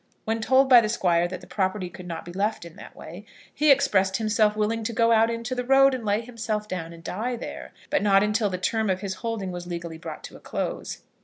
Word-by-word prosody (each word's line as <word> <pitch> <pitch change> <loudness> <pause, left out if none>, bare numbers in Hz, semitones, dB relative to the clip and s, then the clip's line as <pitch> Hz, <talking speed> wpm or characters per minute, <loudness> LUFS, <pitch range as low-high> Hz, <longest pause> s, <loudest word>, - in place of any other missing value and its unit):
When 225 +1 -1
told 265 +3 +4
by 250 -3 +8
the 215 - -1
Squire 175 -6 +2
that 180 0 -7
the - - -12
property 190 -1 -2
could 180 +1 -11
not 165 -2 -6
be 175 - -9
left 200 -1 -1
in 170 - -12
that - - -12
way, - - -10 0.3
he 300 0 +2
expressed 200 -9 +3
himself 215 -1 +2
willing 215 +2 0
to 230 - -2
go 230 +1 +3
out 225 0 +4
into 230 +1 -3
the 250 0 -2
road, 270 +1 +5
and 255 -3 -4
lay 210 +1 +1
himself 225 -3 -4
down 170 -4 -5
and 165 0 -13
die 235 +9 -3
there; 235 - -8 0.2
but - - +2
not 195 -1 +4
until 210 0 +1
the 185 - -3
term 220 +3 0
of 185 0 0
his 195 -2 -3
holding 225 -5 -3
was 175 0 -7
legally 170 -2 -6
brought - - -8
to - - -10
a - - -12
close. - - -5
210 Hz, 245 wpm, -25 LUFS, 185-230 Hz, 0.3 s, by